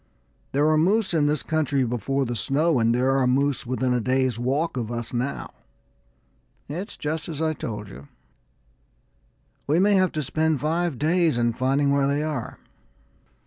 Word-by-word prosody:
There 145 Hz, +2 st, +2 dB
were 155 Hz, 0 st, +4 dB
moose 195 Hz, +4 st, +2 dB
in 150 Hz, -3 st, +3 dB
this 150 Hz, 0 st, 0 dB
country 145 Hz, -4 st, 0 dB
before 130 Hz, +3 st, -1 dB
the 120 Hz, 0 st, -3 dB
snow, 145 Hz, +4 st, +1 dB
and 115 Hz, +1 st, +2 dB
there 130 Hz, +2 st, +2 dB
are 130 Hz, -2 st, +2 dB
moose 135 Hz, 0 st, +1 dB
within 130 Hz, 0 st, 0 dB
a 125 Hz, -, +1 dB
day's 130 Hz, -1 st, 0 dB
walk 135 Hz, +7 st, -1 dB
of 120 Hz, -3 st, -3 dB
us 120 Hz, 0 st, -5 dB
now. 125 Hz, +3 st, -3 dB, 1.1 s
It's 180 Hz, +9 st, -6 dB
just 160 Hz, +2 st, -3 dB
as 155 Hz, -3 st, -5 dB
I 160 Hz, -1 st, +1 dB
told 105 Hz, -7 st, -6 dB
you; 70 Hz, -7 st, -12 dB, 1.6 s
we 150 Hz, +3 st, +2 dB
may 200 Hz, +3 st, +4 dB
have 185 Hz, -2 st, +3 dB
to 155 Hz, -, -2 dB
spend 155 Hz, +2 st, 0 dB
five 165 Hz, 0 st, -1 dB
days 160 Hz, -1 st, +2 dB
in 120 Hz, -1 st, +1 dB
finding 135 Hz, +3 st, +1 dB
where 140 Hz, -1 st, +2 dB
they 145 Hz, +2 st, 0 dB
are." 150 Hz, -7 st, -4 dB
140 Hz, 170 wpm, -24 LUFS, 125-155 Hz, 1.6 s, were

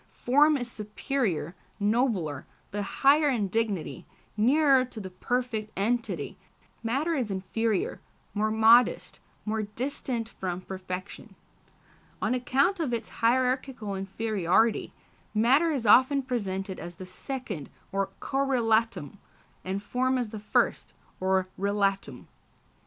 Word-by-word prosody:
Form 290 Hz, +4 st, +3 dB
is 245 Hz, -2 st, -4 dB
superior, 210 Hz, -, -2 dB, 0.3 s
nobler, 205 Hz, -, 0 dB, 0.2 s
the 205 Hz, -, -2 dB
higher 285 Hz, +8 st, +3 dB
in 225 Hz, -7 st, 0 dB
dignity, 210 Hz, -5 st, -2 dB, 0.3 s
nearer 265 Hz, +4 st, +4 dB
to 245 Hz, -3 st, -9 dB
the 190 Hz, -3 st, -7 dB
perfect 225 Hz, +2 st, -2 dB
entity; 230 Hz, +4 st, -1 dB, 0.4 s
matter 270 Hz, +9 st, 0 dB
is 255 Hz, -8 st, -1 dB
inferior, 195 Hz, +2 st, -1 dB, 0.3 s
more 215 Hz, +1 st, +1 dB
modest, 225 Hz, +3 st, +4 dB, 0.3 s
more 220 Hz, 0 st, -1 dB
distant 235 Hz, +2 st, -3 dB
from 185 Hz, -5 st, -5 dB
perfection. 185 Hz, 0 st, -7 dB, 0.8 s
On -, -, 0 dB
account 270 Hz, +9 st, +1 dB
of 270 Hz, -8 st, 0 dB
its 230 Hz, -, -6 dB
hierarchical 250 Hz, -2 st, +1 dB
inferiority, 200 Hz, +1 st, +1 dB, 0.4 s
matter 265 Hz, +10 st, +4 dB
is 265 Hz, -6 st, -2 dB
often 260 Hz, +6 st, +6 dB
presented 195 Hz, -7 st, -3 dB
as 175 Hz, 0 st, -8 dB
the 185 Hz, -, -8 dB
second, 195 Hz, -, -6 dB, 0.2 s
or 195 Hz, 0 st, 0 dB
correlatum, 230 Hz, -, 0 dB, 0.4 s
and 195 Hz, +2 st, -3 dB
form 255 Hz, +4 st, 0 dB
as 245 Hz, -3 st, -2 dB
the 215 Hz, 0 st, -7 dB
first, 210 Hz, -, 0 dB, 0.3 s
or 190 Hz, 0 st, +1 dB
relatum. 200 Hz, 0 st, -1 dB
225 Hz, 115 wpm, -28 LUFS, 195-255 Hz, 0.8 s, often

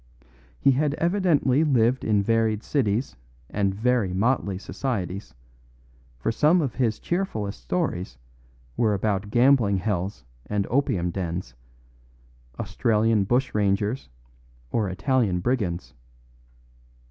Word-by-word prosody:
He 140 Hz, -, +4 dB
had 145 Hz, +2 st, +1 dB
evidently 170 Hz, -6 st, +2 dB
lived 130 Hz, -4 st, +2 dB
in 105 Hz, -2 st, +2 dB
varied 110 Hz, 0 st, +1 dB
cities 120 Hz, -3 st, 0 dB, 0.4 s
and 100 Hz, -1 st, +1 dB
very 115 Hz, -3 st, +1 dB
motley 100 Hz, -2 st, +1 dB
societies, 95 Hz, -, -4 dB, 0.8 s
for 90 Hz, -, -1 dB
some 155 Hz, +10 st, +4 dB
of 140 Hz, -8 st, -1 dB
his 115 Hz, -5 st, 0 dB
cheerfullest 110 Hz, -, -3 dB
stories 60 Hz, +2 st, -2 dB, 0.6 s
were 110 Hz, +2 st, +2 dB
about 100 Hz, 0 st, -1 dB
gambling 120 Hz, -4 st, +4 dB
hells 95 Hz, -, -3 dB, 0.2 s
and 105 Hz, -1 st, 0 dB
opium 100 Hz, -10 st, +1 dB
dens, 85 Hz, -7 st, -4 dB, 1.1 s
Australian 110 Hz, -2 st, +1 dB
bushrangers 105 Hz, -, 0 dB, 0.6 s
or 105 Hz, -4 st, 0 dB
Italian 95 Hz, +1 st, +1 dB
brigands. 90 Hz, -, -2 dB
110 Hz, 100 wpm, -25 LUFS, 95-130 Hz, 1.1 s, He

